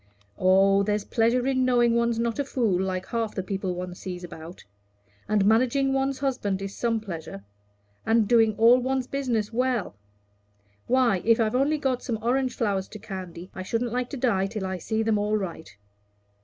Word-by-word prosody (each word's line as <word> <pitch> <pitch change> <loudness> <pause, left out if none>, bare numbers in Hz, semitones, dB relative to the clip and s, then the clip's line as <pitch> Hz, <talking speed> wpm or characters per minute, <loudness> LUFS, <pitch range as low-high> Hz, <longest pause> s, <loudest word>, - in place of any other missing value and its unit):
"Oh, 195 +1 +4
there's 210 0 -1
pleasure 235 +2 +1
in 260 -1 +1
knowing 240 -2 +3
one's 235 -1 +1
not 235 +2 -1
a - - +2
fool, 225 -9 0
like 190 -1 -2
half 225 0 -3
the 190 - -2
people 190 -1 -3
one 180 0 -5
sees 180 0 -7
about. 170 0 -10 0.6
And 210 -2 +2
managing 255 +5 +3
one's 270 0 0
husband 250 -8 -1
is 195 0 -6
some 230 -2 0
pleasure; 165 - -8 0.6
and 225 -1 +2
doing 225 -2 +4
all 235 +3 +6
one's 260 0 -1
business 240 -6 -2
well. 250 - 0 0.9
Why, 240 -7 +2
if 230 0 +4
I've 220 -1 +1
only 280 +4 +2
got 265 -4 -1
some 230 -3 -3
orange 250 +3 0
flowers 200 -5 -1
to 215 - -10
candy, 185 -3 -8
I 185 - -6
shouldn't 230 +5 -2
like 250 0 -1
to 280 - -6
die 200 -7 +1
till 205 -1 -5
I 190 -1 -3
see 220 +6 -1
them 220 -2 +1
all 210 +1 +1
right. 175 -5 -6
225 Hz, 185 wpm, -26 LUFS, 195-250 Hz, 0.9 s, all